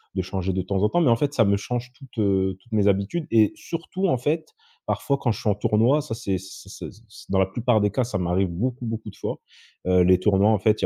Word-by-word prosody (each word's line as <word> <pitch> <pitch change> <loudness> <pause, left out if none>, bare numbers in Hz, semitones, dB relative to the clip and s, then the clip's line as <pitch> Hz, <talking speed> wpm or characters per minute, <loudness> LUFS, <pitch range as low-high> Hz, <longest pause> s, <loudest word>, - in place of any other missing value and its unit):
de 95 - +1
changer 95 0 -3
de 95 - 0
temps 95 +2 -2
en 105 - +4
temps. 175 - +2
Mais 140 - +4
en 115 - +5
fait, 145 +1 -1
ça 115 -6 +4
me 100 0 +3
change 125 +4 -4
toutes, 135 -4 -16
heu, 95 -2 +1
toutes 120 - -26
mes 105 -1 +3
habitudes 100 - 0
et 110 -3 +4
surtout, 180 +3 -3
en 130 - +2
fait, 155 +5 -1 0.4
parfois 140 -1 0
quand 120 -4 +1
je 105 - -4
suis - - 0
en 100 - +2
tournoi, 115 +8 +2
ça 140 -6 -5
c'est 100 -6 -2
c'est 95 +1 -12
ça - - -8
ça 105 - -19
c'est - - -15
dans 95 - +3
la 95 - +4
plupart 115 +2 +1
des 105 - +2
cas, 125 +5 0
ça 115 -4 -3
m'arrive 90 +1 +1
beaucoup, 120 +8 -3
beaucoup 110 -1 -4
de - - -19
fois, - - -4 0.5
heu, 90 0 +4
les 90 0 +5
tournois 100 +2 +3
en 105 - +2
fait, 110 +1 +2
il - - +2
105 Hz, 275 wpm, -24 LUFS, 95-125 Hz, 0.5 s, en